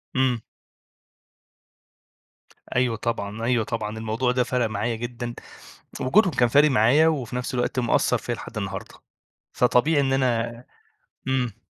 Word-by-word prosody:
إمم. 130 -3 +2 2.4
أيوه 125 -2 +2
طبعًا، 110 -1 -3
أيوه 120 -1 +2
طبعًا، 110 -1 -4
الموضوع 110 +3 -1
ده 125 0 +2
فَرَق 125 -1 0
معايا 110 +2 -2
جدًا، 120 +1 -5 0.7
وجودهم 185 +7 +4
كان 120 -1 +3
فارق 145 +3 +5
معايا 130 +8 +4
وفي 130 -7 -1
نفس 125 +1 -3
الوقت 125 +1 0
مأثّر 120 - +2
فيا - - -3
لحد - - -9
النهاردة، - - -5 0.6
فطبيعي 140 +5 +3
إن 135 -1 +1
أنا 120 -2 0 0.6
إمم. 125 -5 -1
120 Hz, 130 wpm, -24 LUFS, 115-130 Hz, 2.4 s, فارق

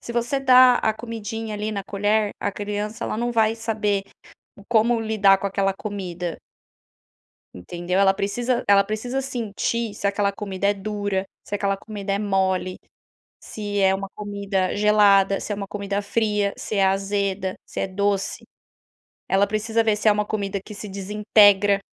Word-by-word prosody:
Se 235 - -7
você 240 +3 0
dá 255 -2 +7
a 220 - +1
comidinha 225 -1 -6
ali 210 +1 -3
na 200 -1 -3
colher, 205 +1 0
a 205 - -1
criança, 210 +2 -4
ela - - -3
não 240 +2 -1
vai 225 -1 +2
saber 210 -3 -1 0.5
o 200 - -16
como 235 0 +3
lidar 210 -3 +3
com 200 - -3
aquela 195 0 0
comida. 185 -4 -5 1.2
Entendeu. 175 - -3
Ela 195 -1 +5
precisa 235 +5 -1
ela 200 -1 +6
precisa 220 +6 -3
sentir 230 -2 -3
se 200 - -3
aquela 200 0 +1
comida 200 -1 -3
é 205 - +2
dura, 205 -1 -2 0.2
se - - -5
aquela 195 -1 0
comida 200 -1 -5
é 200 - 0
mole, 190 -2 0 0.6
se 205 -1 -4
é 190 -1 +4
uma 195 0 -3
comida 200 -3 -2
gelada, 200 -2 +4
se - - -6
é - - -3
uma 200 -1 -5
comida 200 0 -3
fria, 210 -1 0
se - - -5
é 195 -1 +4
azeda, 195 -1 -1
se - - -7
é - - -1
doce. 195 0 -1 0.9
Ela 195 +1 +3
precisa 220 +2 0
ver 220 -2 +2
se 215 +1 +2
é - - +7
uma 210 0 0
comida 200 -2 -3
que 210 - -10
se 210 +1 -8
desintegra 205 0 +3
205 Hz, 170 wpm, -23 LUFS, 195-215 Hz, 1.2 s, dá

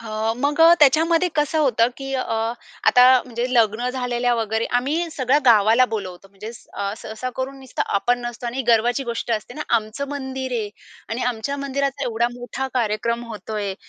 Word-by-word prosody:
अ, 220 0 -2
मग 290 +4 0 0.2
त्याच्यामध्ये 325 +5 +4
कसं 295 +1 +1
होतं 240 -6 +3
की 270 0 -6
अ, 255 - 0 0.6
आता 250 0 +7 0.2
म्हणजे 240 0 -3
लग्न 230 +1 +2
झालेल्या 245 -1 -1
वगैरे 225 0 -1
आम्ही 310 +7 -1
सगळ्या 265 0 +2
गावाला 225 +2 +6
बोलवतो, 195 -2 -5
म्हणजे 200 +3 -9 0.2
अ, 200 0 -3
सहसा 220 +4 -6
करून 265 +1 -4
नुसतं 260 - -3
आपण 245 +5 +2
नसतो 240 0 -6
आणि 255 +3 -3
गर्वाची 235 +4 +3
गोष्ट 235 0 -4
असते 215 +2 -4
ना, 300 - -4
आमचं 225 +6 -4
मंदिर 265 -2 -5
आहे 220 -4 -2 0.4
आणि 230 +3 -3
आमच्या 250 +3 -2
मंदिराचा 280 0 -2
एवढा 235 0 0
मोठा 245 +2 -5
कार्यक्रम 235 0 -1
होतो 215 -1 -7
आहे. 200 -2 -2
245 Hz, 170 wpm, -22 LUFS, 220-270 Hz, 0.6 s, आता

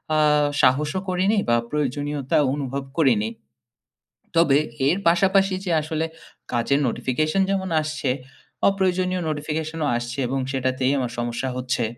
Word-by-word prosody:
আ - - +3 0.4
সাহসও 150 +7 +2
করিনি 190 +4 +2
বা 120 - +5 0.2
প্রয়োজনীয়তা 145 -1 -1 0.2
অনুভব 140 -1 -3
করিনি। 120 -9 +3 1.1
তবে 150 -4 +5 0.3
এর 175 +6 +2
পাশাপাশি 190 +2 +3
যে 180 - -3
আসলে 155 +1 -2 0.5
কাজের 125 +4 +1
নোটিফিকেশন 145 +9 0
যেমন 190 -1 -1
আসছে 155 -3 -2 0.6
অপ্রয়োজনীয় 185 -2 0
নোটিফিকেশন 155 +1 -3
ও - - +1
আসছে 120 +3 -5
এবং 135 +2 -1
সেটাতেই 130 0 0
আমার 125 -3 -2
সমস্যা 120 +2 -2
হচ্ছে। 125 -1 -1
145 Hz, 125 wpm, -23 LUFS, 130-175 Hz, 1.1 s, বা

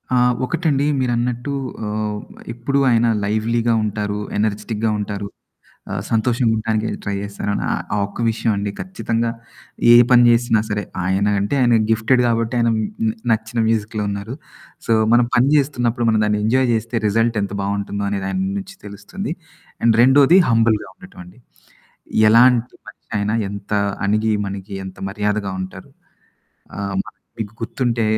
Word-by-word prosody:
ఆ! - - +3 0.3
ఒకటండి 150 -2 0
మీరన్నట్టు 120 +2 -1 0.3
ఆహ్, 105 0 -3 0.3
ఎప్పుడు 130 +4 -1
ఆయన 120 -1 +3 0.2
లైవ్లీగా 115 +3 0
ఉంటారు. 105 -1 -2 0.2
ఎనర్జిటిక్‌గా 105 +1 -1
ఉంటారు. 100 -1 -4 0.7
ఆహ్, - - -3
సంతోషంగా 115 +1 +1
ఉండడాానికి 110 0 -1 0.2
ట్రై 100 - -2
చేస్తాను. 100 0 -4 0.2
ఆహ్, - - -1
ఆ - - 0
ఒక్క 100 +4 -9
విషయం 115 +1 -1
అండి. 100 0 -2
ఖచ్చితంగా 115 -11 -2 0.6
ఏ - - +9 0.2
పని 120 -1 +7
చేసినా 115 -2 +3
సరే, 105 0 -2 0.2
ఆయన 95 +2 +1
అంటే, 100 +6 -1
ఆయన 120 -1 +4 0.2
గిఫ్టెడ్ 115 +3 +3
గాబట్టి, 115 0 0
ఆయన 115 0 +2
మ్ 110 - -1 0.5
నచ్చిన 110 +1 -2
మ్యూజిక్‌లో 110 -1 -1
ఉన్నారు. 100 +4 -5 0.5
సో, - - +2 0.2
మనం 120 0 +4
పని 125 +3 +4
చేేస్తున్నప్పుడు 120 -4 0
మన 110 -1 +2
దాన్ని 105 0 0
ఎంజాయ్ 130 +3 +2
జేస్తే, 115 +1 -2
రిజల్ట్ 115 +2 +1
ఎంత 100 - -4
బావుంటుందో, 100 0 -3
అనేది 100 -1 -2
ఆయన 95 - -2 0.2
నుంచి 195 0 -9
తెలుస్తుంది. 105 - -6 0.5
అండ్ 115 -1 +4
రెండోది 140 +7 +6
హంబుల్‌గా 115 -2 +2
ఉండటంఅండి. 100 - -14 0.9
ఎలాంటి 120 +1 +4
మనిషి 105 - -16
ఆయినా, 105 +2 -1 0.2
ఎంత 100 0 -8 0.3
అణిగి 110 +2 +1
మణగి 100 0 -6
ఎంత 95 - -10
మర్యాదగా 105 -1 -2
ఉంటారు. 95 - -10 0.9
ఆహ్, 100 -1 -3
మన - - -13 0.3
మీకు 105 0 -5
గుర్తుంటే 115 0 -1
110 Hz, 145 wpm, -20 LUFS, 105-120 Hz, 0.9 s, ఏ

